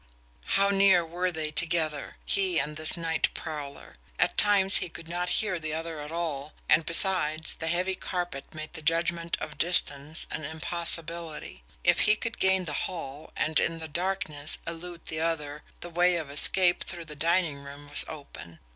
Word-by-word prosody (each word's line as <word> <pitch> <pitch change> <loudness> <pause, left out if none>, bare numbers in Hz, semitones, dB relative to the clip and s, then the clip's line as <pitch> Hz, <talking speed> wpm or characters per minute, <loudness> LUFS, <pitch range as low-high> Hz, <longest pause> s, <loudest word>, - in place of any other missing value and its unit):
How 200 0 +4
near 195 -3 +4
were 180 +2 -2
they 155 -2 -4
together, 155 -2 -1
he 190 -3 +1
and 150 0 -1
this 155 +2 +1
night 165 -1 0
prowler? 145 -3 -7 0.2
At - - +1
times 200 -2 +5
he 180 - -2
could 165 0 -10
not 175 +1 -2
hear 190 -5 -2
the 155 -1 -4
other 165 -1 -5
at 150 +1 -8
all, 155 -4 -4
and, 160 - +3
besides, 165 -3 +2
the 160 - -3
heavy 180 +3 0
carpet 175 -6 -4
made 155 0 -8
the - - -6
judgment 170 +1 +1
of 150 - -7
distance 155 -3 +1
an 155 - -4
impossibility. 165 - -2 0.2
If - - +4
he 215 - +4
could 230 +1 -5
gain 190 -1 +3
the 150 - -4 0.2
hall, 150 -5 -8
and, 155 0 +1
in 165 - 0
the 160 -1 -7
darkness, 170 -3 -2
elude 170 +1 -7
the 160 - -4
other, 150 -3 -2 0.2
the 175 - -7
way 175 +1 +3
of 155 -4 -4
escape 175 +5 +7
through 170 -2 -6
the 150 -1 -8
dining 165 -1 +1
room 140 +1 -11
was 145 - +4
open. 85 - -10
165 Hz, 175 wpm, -28 LUFS, 155-175 Hz, 0.2 s, escape